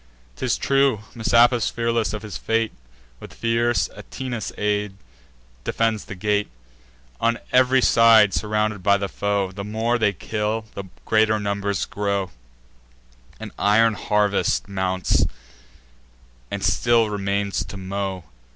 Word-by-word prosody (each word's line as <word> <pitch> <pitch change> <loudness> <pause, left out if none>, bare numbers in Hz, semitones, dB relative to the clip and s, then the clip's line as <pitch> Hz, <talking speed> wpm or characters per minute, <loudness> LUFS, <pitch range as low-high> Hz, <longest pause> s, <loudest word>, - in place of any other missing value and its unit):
'Tis - - -1
true, 135 -5 +2
Messapus, 120 +1 +3
fearless 115 -4 -1
of 105 +1 -6
his 105 - -7
fate, 115 0 0 0.5
With - - -12
fierce 115 +1 +1
Atinas' 120 -5 -6
aid, 105 -1 -1 0.7
defends 115 - -1
the 100 - -8
gate: 105 +2 0 0.7
On 115 0 +1 0.2
ev'ry 130 0 +4
side 110 -3 +6
surrounded 105 -1 -1
by 100 +2 +4
the 100 0 -3
foe, 100 -1 -1
The 100 +1 -7
more 110 +4 -1
they 105 -2 +3
kill, 105 +4 -3
the 100 - -6 0.2
greater 110 0 +3
numbers 100 -1 -2
grow; 100 -3 -2 1.1
An - - -7
iron 110 +2 +4
harvest 105 0 0
mounts, 95 -1 0 1.3
and - - -4
still 115 -2 +2
remains 100 0 -1
to 100 - -9
mow. 95 -1 -4
105 Hz, 125 wpm, -22 LUFS, 100-115 Hz, 1.3 s, side